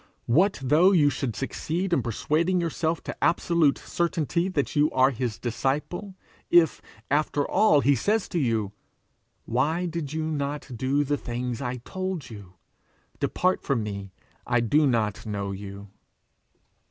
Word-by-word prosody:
What 185 - +3
though 155 +8 +5
you 145 -5 +4
should 130 -4 -3
succeed 175 - -2
in 140 - +3
persuading 155 - 0
yourself 165 -1 -1
to - - -6
absolute 170 -4 +3
certainty 170 +1 -1
that 145 -7 -2
you 150 +1 +4
are 130 +1 +3
his 120 -3 -3
disciple, 150 - -2 0.3
if, 170 -3 +4 0.3
after 145 -1 +1
all, 180 -10 +4
he 140 - +4
say 205 - +2
to 185 -5 -3
you, 115 -7 0 0.7
'Why 150 +9 0
did 165 -4 -4
you 160 0 -2
not 145 -2 -3
do 135 +5 +1
the 145 +1 0
things 120 -1 -4
I 125 -1 -3
told 185 -7 -4
you? 100 -4 -11 0.7
Depart 185 +1 +1
from 130 -6 0
me; 100 -2 -6 0.4
I 120 -1 +2
do 145 +6 +3
not 110 -5 0
know 100 -2 -3
you!' 100 +1 -8
145 Hz, 145 wpm, -26 LUFS, 120-170 Hz, 0.7 s, though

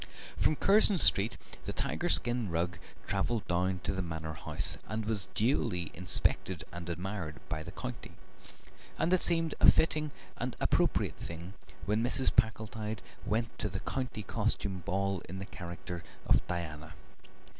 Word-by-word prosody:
From 155 - +2
Curzon 200 +3 +6
Street 110 - +5 0.3
the - - -3
tiger - - -1
skin 120 -3 +1
rug 85 +1 -1 0.3
travelled 100 +3 -1
down 90 +1 0
to 95 - -1
the 95 - -2
Manor 80 -2 -4
House, 80 - -3
and 110 +1 -3
was 105 -4 +4
duly 105 - +1
inspected 90 0 0
and 85 0 -7
admired 90 -2 -4
by 75 - -2
the - - -7
county, - - -6 0.8
and 175 - +2
it 185 - +4
seemed 165 -2 +4
a - - +9
fitting 155 -1 +2 0.3
and - - -3
appropriate - - +1
thing 85 +3 -7 0.3
when 105 +3 +1
Mrs. 130 +2 +2
Packletide 110 -2 0 0.2
went 110 +2 -1
to 105 - 0
the 95 0 -4
County 125 -5 -3
Costume 100 -2 -1
Ball 100 -1 0
in 95 - -5
the 95 - -5
character 85 -2 -7 0.2
of - - +3
Diana. 80 -3 -4
95 Hz, 150 wpm, -32 LUFS, 85-115 Hz, 0.8 s, a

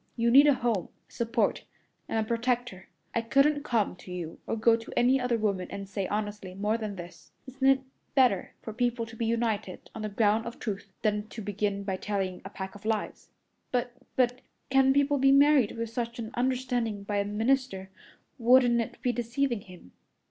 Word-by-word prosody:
You 235 0 +2
need 280 +4 +8
a 285 - +5
home, 230 -8 -1 0.2
a - - -28
support, 230 -2 0 0.5
and - - -1
a 220 -1 0
protector. 235 -4 -1 0.3
I 230 - +1
couldn't 275 +5 +3
come 230 -9 0
to 180 - -12
you 175 -3 -6
or - - -1
go 225 +1 +4
to 230 0 -8
any 255 +2 +4
other 250 -1 +1
woman 200 -4 -1
and 200 0 -6
say 195 -1 -3
honestly 205 -3 -4
more 210 +3 0
than 215 -3 -4
this. 175 -1 -11
Isn't 265 0 -1
it 270 0 +5 0.3
better 250 -9 +3
for 220 - -6
people 240 0 0
to 225 0 -12
be 225 0 -2
united 225 -5 -2
on 220 - -6
the 215 - -3
ground 215 +2 +2
of 235 - -7
truth 200 -2 -5
than 210 0 0
to 220 0 -8
begin 205 0 -2
by 190 -1 -2
telling 195 -2 -3
a 195 - -7
pack 190 -1 -7
of 205 0 -13
lies?" 220 -1 -3 0.4
"But 245 -1 0 0.2
but 250 0 +2 0.3
can 270 0 +5
people 285 +1 +2
be 270 +1 +5
married 275 -5 +5
with 230 -1 -3
such 235 0 -3
an 225 -1 -5
understanding 245 -4 -1
by 205 0 -2
a 200 - +2
minister? 210 -2 0 0.5
Wouldn't 240 0 +5
it 225 - -6
be 250 - +2
deceiving 240 0 -1
him?" 180 - -14
230 Hz, 195 wpm, -28 LUFS, 205-250 Hz, 0.5 s, need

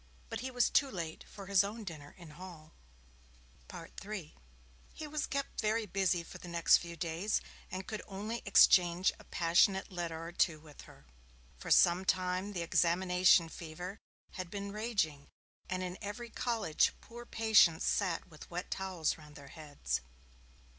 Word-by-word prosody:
But - - -3
he 260 - -4
was 245 -1 +2
too 275 - +3
late 170 -7 -6
for 200 - -10
his 195 0 +4
own 215 +3 -5
dinner 155 -6 -9
in 170 -4 -12
Hall. 160 -1 -11 1.0
III 195 -6 -8 0.6
He 310 - -6
was 300 0 -3
kept 280 -1 -3
very 220 +1 +1
busy 185 -3 0
for - - -11
the - - -10
next 170 -1 +5
few 170 -1 -8
days, 170 +5 -1 0.3
and 185 0 -5
could 215 - -5
only 210 +4 -4
exchange 180 -3 +5
a - - -13
passionate 185 +4 +2
letter 170 -2 -4
or 165 - -6
two 170 -2 +1
with 150 -2 -14
her. 70 - -17 0.5
For - - -7
some 175 +1 +5
time 185 +2 0
the 175 -3 -2
examination 180 +1 +4
fever 175 +5 -8 0.3
had 185 -3 -6
been 200 +1 -5
raging, 200 -10 -1 0.4
and 185 0 -2
in 180 0 -5
every 220 +3 -6
college 225 -10 +1
poor 235 +1 -11
patients 220 -8 +4
sat 185 -5 0
with 155 -4 -13
wet 175 +2 -5
towels 185 -5 -1
round 150 -1 -14
their 140 -1 -12
heads. 150 - -4
185 Hz, 160 wpm, -33 LUFS, 165-205 Hz, 1.0 s, next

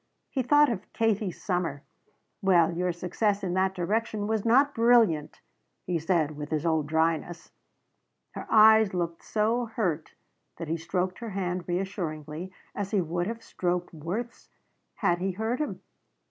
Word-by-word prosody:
He 265 - 0
thought 290 +2 +5
of 210 -3 -6
Katie's 215 -4 0
summer. 175 -7 -2 0.6
"Well 175 -4 +4
your 180 +1 0
success 195 +4 -1
in 180 -2 -1
that 190 +1 +1
direction 210 +3 -1
was 220 -1 0
not 270 +5 +4
brilliant," 225 -10 +3 0.4
he 175 -2 -1
said 160 -2 0
with 145 0 -6
his 155 0 -1
old 160 -3 +1
dryness. 165 +2 -1 0.8
Her - - -8
eyes 220 -2 +6
looked 170 -1 -3
so 225 +3 0
hurt 180 -9 -2 0.4
that 165 -2 -6
he 165 - 0
stroked 180 +3 -2
her 230 -1 -5
hand 180 -2 -2
reassuringly, 175 -2 -4 0.2
as 200 -1 -3
he 205 - +1
would 175 +1 -1
have 230 +1 -5
stroked 175 -1 -2
Worth's 185 +10 -5 0.5
had 175 0 +1
he 190 +1 -1
hurt 220 +6 -2
him. 300 - -4
185 Hz, 150 wpm, -27 LUFS, 170-220 Hz, 0.8 s, eyes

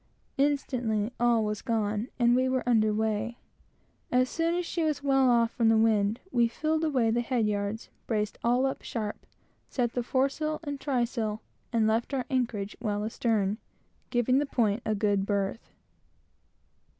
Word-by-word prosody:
Instantly 250 -6 0
all 235 -2 +3
was 210 0 -3
gone, 215 -2 -1
and 240 -1 +4
we 255 +1 +2
were 260 -1 -1
under 220 -3 +4
weigh. 220 +2 -1 0.7
As 255 +1 +2
soon 335 +1 0
as 355 0 -1
she 335 - -2
was 305 -2 -1
well 270 -2 +4
off 235 -1 +3
from 230 -2 +2
the 225 - +5
wind, 220 -1 +2
we 235 -1 +3
filled 310 +6 -1
away 255 -8 +2
the 240 +1 +1
head 240 -2 0
yards, 205 +1 -2 0.2
braced 210 -2 -1
all 245 +3 +3
up 270 - -2
sharp, 215 -3 -5 0.4
set 240 -3 -1
the 245 - 0
foresail 275 +5 0
and 285 -2 -4
trysail, 235 -5 -1 0.3
and 230 -2 +2
left 225 +5 0
our 255 - -1
anchorage 230 -6 -1
well 210 -2 -1
astern, 215 -2 0 0.5
giving 250 +1 +2
the 290 - -1
point 225 -4 +1
a 215 - +1
good 205 -1 +1
berth. 200 +2 -2
235 Hz, 160 wpm, -28 LUFS, 215-260 Hz, 0.7 s, the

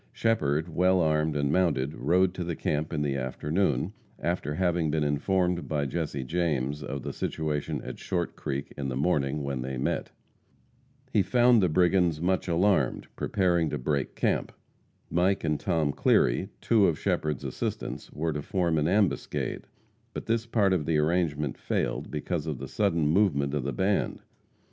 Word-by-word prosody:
Shepherd, 80 -9 +1
well 90 +2 +2
armed 75 -2 +2
and 70 -1 +1
mounted, 75 -5 +1
rode 90 +2 +2
to 90 - -4
the 85 -1 -3
camp 75 +1 -1
in 75 - -1
the 70 -2 0
afternoon, 70 +4 -1 0.2
after 75 +1 -2
having 85 -2 +1
been 75 0 +1
informed 85 +2 0
by 75 -1 0
Jesse 70 -2 -3
James 75 -2 -1
of 70 -1 -5
the - - -4
situation 75 -1 -2
at - - -7
Short 90 -3 -2
Creek 70 0 -4
in 70 -1 -3
the 65 - -3
morning 70 -1 0
when 70 -2 -3
they 65 +1 -4
met. 65 - -1 1.0
He 105 - +5
found 120 +1 +4
the 90 - +3
brigands 90 -1 +3
much 95 +3 0
alarmed, 90 +3 +1
preparing 85 -5 +1
to - - -2
break 70 +2 -2
camp. - - 0 0.6
Mike 90 +4 +2
and 75 -2 0
Tom 80 -6 +1
Cleary, - - +2
two 110 -4 +4
of 80 - +1
Shepherd's 80 -6 -1
assistants, - - -4
were 80 +1 -2
to 75 - -3
form 85 0 0
an 75 - +1
ambuscade, 100 +1 0 0.5
but - - -5
this 115 0 0
part 105 -5 +2
of 80 -6 -1
the 80 -2 +2
arrangement 75 -3 0
failed - - -2
because 75 +1 -3
of 75 -4 -2
the 65 +2 -6
sudden 85 -2 +1
movement 75 -5 +2
of 75 - 0
the 70 - -2
band. 100 +4 0
80 Hz, 165 wpm, -28 LUFS, 75-90 Hz, 1.0 s, He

